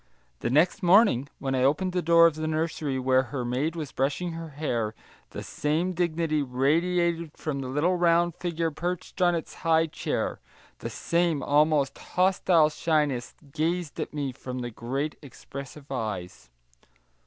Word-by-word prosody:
The - - -2
next 155 +8 +3
morning, 180 - +5
when 135 -1 -3
I 130 - +1
opened 150 +8 +2
the 180 - +1
door 170 0 +6
of 165 - +4
the 155 +1 -3
nursery 155 -3 -1
where 130 0 +3
her 130 -4 -3
maid 135 +7 -1
was 155 -5 -5
brushing 145 +7 -1
her 165 0 -6
hair, 120 -7 -2 0.3
the - - -7
same 160 +5 -1
dignity 165 -3 0
radiated 165 +5 0
from 145 -3 -3
the 135 - -4
little 150 +8 +1
round 170 0 +3
figure 165 -1 -2
perched 175 +4 -4
on 175 -1 +4
its 165 - -5
high 160 0 +3
chair, 160 - -3 0.4
the - - -5
same 170 -4 0
almost 145 -1 +2
hostile 180 -3 +3
shyness 150 -5 0 0.2
gazed 165 +1 -2
at - - -3
me 145 -3 -3
from 125 0 -6
the 120 0 -4
great 135 +7 -3
expressive 140 0 -10
eyes. 90 - -5
155 Hz, 155 wpm, -27 LUFS, 135-170 Hz, 0.4 s, door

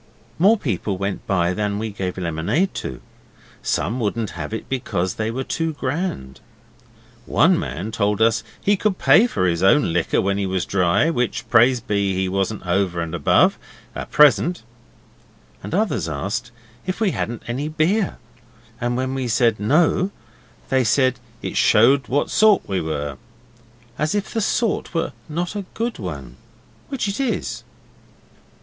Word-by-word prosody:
More 205 +6 +5
people 100 - -2
went 100 +1 -4
by 90 -2 +1
than 105 0 -1
we 110 +1 -3
gave 95 -2 -4
lemonade 85 - 0
to. - - -6 0.6
Some 120 +4 -1
wouldn't 110 -1 -1
have - - -6
it 110 - -5
because 95 -8 -2
they 110 0 -2
were 130 +4 -3
too 165 +3 -2
grand. 135 - -3 0.9
One - - +4
man 90 +10 -4
told 105 -1 0
us 115 0 +3 0.2
he 205 - +2
could 200 -1 0
pay 165 - +5
for 95 - -1
his 85 -1 0
own 95 - +4
liquor 85 -1 +1
when 100 +1 0
he 100 - -1
was 95 -1 -1
dry, 95 - +2
which, 125 -6 -2
praise 120 +2 +5
be, 100 -4 0
he 95 0 0
wasn't 95 +2 -2
over 90 -1 0
and 85 -1 -3
above, 80 -4 +3 0.3
at - - -6
present; 150 0 +4 1.0
and - - -7
others 200 - 0
asked 100 - -3 0.4
if 185 - -2
we 215 -4 +2
hadn't 120 -5 -4
any 130 +5 -3
beer, 170 +6 0 0.6
and 120 0 -1
when 130 +1 -1
we 130 -2 -2
said 115 -1 +2
'No', 160 - +2 0.6
they 130 -1 +3
said 130 +2 +2 0.2
it - - -4
showed 130 +6 +4
what 145 +3 0
sort 215 -2 +4
we 95 -2 -1
were 75 -3 -3 0.8
as 150 +5 0
if 205 0 -2
the 225 - 0
sort 215 -3 -1
was 165 - 0 0.2
not 175 +5 -3
a 200 -2 -4
good 230 - -2
one, 70 - -7 0.5
which 270 -6 -2
it 200 +4 -3
is. 265 -4 -2
115 Hz, 160 wpm, -21 LUFS, 95-155 Hz, 1.0 s, More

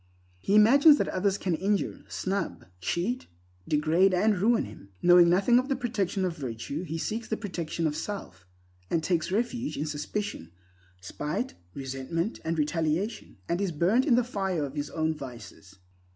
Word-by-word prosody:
He 195 - +1
imagines 280 +8 +7
that - - 0
others 195 +1 0
can 185 -3 -1
injure, 195 +5 -1
snub, 195 +1 -3
cheat, 185 - -2 0.4
degrade 165 +5 +3
and 210 +3 +3
ruin 225 +5 +2
him. 105 -1 -12
Knowing 175 -1 +7
nothing 200 +7 +4
of 260 +3 -3
the 275 - +2
protection 205 -6 -1
of 175 -3 -2
virtue, 135 +2 -5
he 165 -2 -4
seeks 220 +7 -3
the 220 - -2
protection 170 -5 -3
of 150 -1 0
self, 160 - -6 0.4
and 165 -2 0
takes 170 0 0
refuge 240 +5 -1
in 150 - -1
suspicion, 150 - -4 0.5
spite, 150 - -3 0.2
resentment, 135 - -3
and 165 +1 -1
retaliation, 165 - -1
and 175 +3 -1
is 195 -3 0
burnt 185 - +2
in 250 - +5
the 245 - +3
fire 190 -9 -2
of 135 - -7
his 145 -1 -3
own 160 -1 0
vices. 120 -9 -10
180 Hz, 165 wpm, -28 LUFS, 150-210 Hz, 0.5 s, imagines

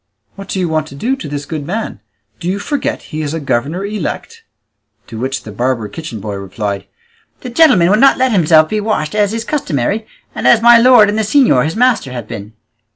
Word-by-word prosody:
What 195 -1 -10
do 190 - -2
you 180 - 0
want 155 -1 -1
to 140 - -11
do 245 - -1
to 265 - -8
this 145 0 -5
good 155 -3 -5
man? 215 +9 -4 0.4
Do 175 - -3
you 190 - -1
forget 265 +8 -3
he 155 - -2
is 150 +1 -3
a - - -3
governor 145 +7 -2
elect?" 450 - -5 0.6
To 110 - -9
which 130 +2 -3
the 110 - -9
barber 120 0 -2
kitchen 125 -2 -7
boy 105 +1 -5
replied, 100 0 -5 0.5
"The 250 - -7
gentleman 235 - +4
will 210 - +4
not 275 +2 +5
let 260 0 +1
himself 160 -5 +4
be 215 +5 -2
washed 205 -8 -2
as 205 -1 +1
is 230 +1 -4
customary, 215 - -2 0.3
and - - -2
as 235 - +6
my 235 +1 +7
lord 245 -3 +6
and 210 +2 -1
the - - +2
señor 220 - +3
his 160 - -3
master 245 - +1
have 120 -4 -6
been." 105 +2 -8
175 Hz, 220 wpm, -15 LUFS, 135-225 Hz, 0.6 s, my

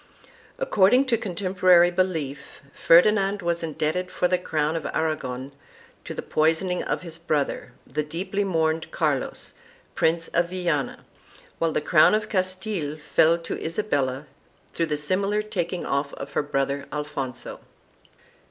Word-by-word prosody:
According 255 - +4
to 235 - +4
contemporary 185 -3 +3
belief, 160 -7 -2
Ferdinand 195 +3 +4
was 170 0 0
indebted 165 +3 -2
for 180 - 0
the 180 0 +1
crown 155 -2 -1
of 165 - -3
Aragon 135 -4 -2 0.5
to - - -6
the - - -5
poisoning 165 +4 +1
of - - -2
his 165 -1 -6
brother, 150 -6 -2
the 150 +4 -2
deeply 185 +7 -3
mourned 160 -4 0
Carlos, - - -2 0.4
Prince 165 +1 +1
of 170 0 +1
Viana, 175 -6 -2 0.5
while 165 -1 +1
the - - 0
crown 155 +6 +5
of 215 0 -2
Castile 185 -5 -2
fell 160 +2 +3
to 165 - -6
Isabella 145 -7 -1 0.5
through 165 - 0
the 150 - -1
similar 195 +7 0
taking 180 -4 -3
off 140 +1 -1
of 140 0 -8
her - - +2
brother 140 -1 -2
Alfonso. 135 -4 -5
165 Hz, 135 wpm, -25 LUFS, 150-185 Hz, 0.5 s, crown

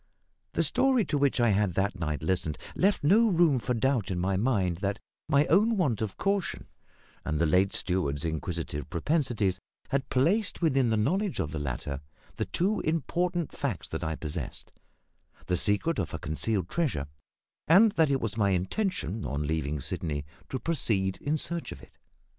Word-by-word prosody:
The - - +2
story 260 -5 +3
to 145 - 0
which 140 -2 +2
I 120 -1 +4
had 100 -3 +1
that 100 +1 +1
night 75 -2 -2
listened 80 -4 -1 0.2
left 195 -2 +2
no 210 +10 +5
room 165 -7 +4
for 125 +1 -1
doubt 115 -4 +1
in 90 - -2
my 95 +2 0
mind 95 -5 +1
that 100 +2 -1 0.3
my 145 -1 +4
own 215 +5 +3
want 130 - +1
of 105 -3 -3
caution 200 -2 -1 0.6
and 75 - -1
the 85 - +2
late 95 +5 +3
steward's 85 -6 -1
inquisitive 80 -2 -3
propensities 115 - 0 0.3
had 135 -1 -1
placed 185 - +1
within 135 -7 +2
the 110 - +2
knowledge 185 - 0
of 75 - -1
the 80 - -3
latter 70 0 -4 0.4
the - - -1
two 200 +5 0
important 170 +1 -1
facts - - -3
that - - -4
I 80 0 -1
possessed 75 -3 -6 0.7
the 90 - 0
secret 105 - +1
of 85 -6 -2
a - - -2
concealed 90 +4 -1
treasure, 135 - -1 0.6
and 200 +7 +7
that 160 -5 +3
it 135 -1 +2
was 110 -3 -2
my 100 -2 +3
intention, 105 - -1
on 75 +1 -2
leaving 75 -1 -1
Sydney, 75 +1 -3 0.2
to 130 - -2
proceed 110 - 0
in 150 +2 0
search 170 +2 -4
of - - -8
it. - - -17
110 Hz, 175 wpm, -28 LUFS, -, 0.7 s, and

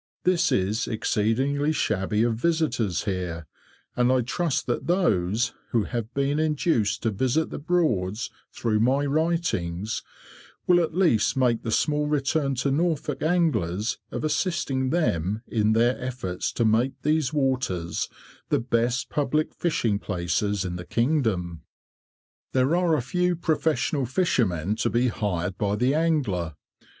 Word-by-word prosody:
This 180 -1 +2
is 100 +4 0
exceedingly 130 +7 0
shabby 105 -6 0
of 120 -1 +2
visitors 120 - 0
here, 90 -4 -3 0.5
and 125 +1 +3
I 130 -1 +3
trust 145 +5 -1
that 120 - -2
those 120 - +1 0.2
who 115 -3 +1
have 115 +1 -4
been 140 +2 +1
induced 150 - +1
to 115 - +1
visit 130 +10 0
the - - -5
Broads 120 - 0 0.2
through 110 -3 0
my 135 +5 +2
writings 140 - -1 0.6
will 175 -1 +5
at 165 -2 -1
least 165 - +3
make 125 -3 +2
the 115 - -4
small 150 +5 +1
return 140 -1 0
to 130 +3 0
Norfolk 150 -2 0
anglers 115 - 0
of - - -5
assisting 150 -5 0
them 110 - 0
in 110 -1 +1
their 120 +3 +2
efforts 120 -8 -3
to 115 - +1
make 115 +5 +2
these 150 -2 +1
waters 130 - -1 0.4
the - - +2
best 120 +1 0
public 150 +1 0
fishing 115 -11 0
places 95 +2 -1
in 90 -1 -3
the 90 - -6
kingdom. 110 - 0 0.9
There 130 +5 +3
are 175 -2 +3
a 125 - -1
few 180 +6 0
professional 150 -5 0
fishermen 110 - 0
to - - +1
be 120 +1 +2
hired 95 -5 -2
by 100 0 +1
the 125 +5 +2
angler. 130 - 0
125 Hz, 140 wpm, -25 LUFS, 105-155 Hz, 0.9 s, will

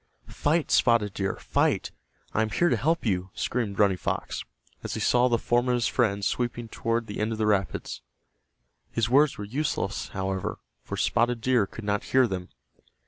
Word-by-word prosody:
"Fight, 155 +2 0
Spotted 115 -5 +3
Deer! 95 -1 -1
Fight! - - 0 0.4
I 110 - +2
am 110 - 0
here 175 +11 +2
to - - +3
help 165 +2 0
you!" 95 -3 0
screamed 110 -5 -2
Running 100 -3 +4
Fox, - - -3 0.4
as - - -4
he - - -3
saw 125 0 +3
the 120 -2 +2
form 120 +2 +1
of 125 - +3
his 120 -1 0
friend 100 -5 +1
sweeping 120 -1 -2
toward 115 +1 -1
the 105 - -6
end 105 +1 0
of - - -4
the 110 - 0
rapids. 100 -4 -1 0.9
His 115 0 0
words 145 +2 +4
were 105 - -5
useless, 120 -4 -2
however, 95 -1 -3 0.2
for - - -6
Spotted 120 0 +1
Deer 120 -3 +2
could 115 - -9
not 105 0 0
hear 130 0 +4
them. 90 -3 -5
115 Hz, 185 wpm, -27 LUFS, 100-125 Hz, 0.9 s, Running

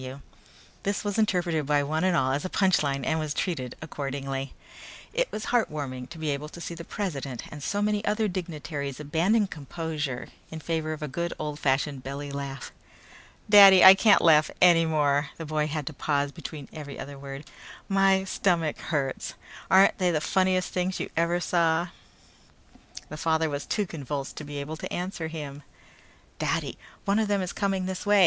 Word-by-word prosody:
F.W." 130 +2 -8 0.6
This 200 +1 -2
was 205 +1 -1
interpreted 175 -8 +1
by 145 -1 +3
one 155 +3 -1
and 185 -2 +3
all 130 -1 +2
as 140 +2 -1
a 185 - -3
punch 190 -2 +3
line 140 -2 -1
and 160 0 +1
was 155 -2 -3
treated 130 -10 -2
accordingly. 135 -2 -4 0.6
It - - 0
was 215 - -4
heartwarming 140 - -1
to 170 - -10
be 155 -2 -1
able 145 +2 -4
to 170 - -11
see 170 - -5
the 170 0 -8
president 145 - -4
and 150 - -8
so 205 +8 -1
many 210 0 0
other 215 +1 +1
dignitaries 150 -7 -5
abandon 170 +9 +2
composure 150 -5 -5 0.2
in 160 - -7
favor 160 -1 -2
of 155 - -7
a - - -2
good 170 +5 -3
old 150 -1 -4
fashioned 135 0 0
belly 140 +1 -5
laugh. 140 -2 -6 0.8
"Daddy, 195 -3 +9
I 190 - +12
can't 205 +2 +5
laugh 155 -2 +6
any 170 -2 +6
more," 145 -2 +2
the 165 - -6
boy 150 0 0
had 150 -1 -3
to 155 - -5
pause 145 0 0
between 145 0 -8
every 145 -3 -7
other 140 0 -8
word. 140 +1 -8 0.4
"My 195 -1 +3
stomach 175 -5 0
hurts. 140 -4 -2 0.3
Aren't 190 +3 +5
they 180 -1 +3
the 160 -3 +1
funniest 185 +2 +1
things 185 +1 -1
you - - -4
ever 170 +1 +1
saw?" 170 -1 +1 1.2
The 155 - -7
father 160 0 +1
was 145 0 -4
too 210 - 0
convulsed 145 -5 -5
to - - -5
be 145 0 -7
able 145 +3 -5
to - - -6
answer 175 -2 -3
him. 145 -3 -7 0.8
"Daddy, - - -1 0.3
one 200 +2 +2
of 220 - +1
them 200 -2 +1
is 180 - -4
coming 195 -2 -1
this 185 0 -4
way! 205 0 +4
160 Hz, 185 wpm, -27 LUFS, 145-185 Hz, 1.2 s, I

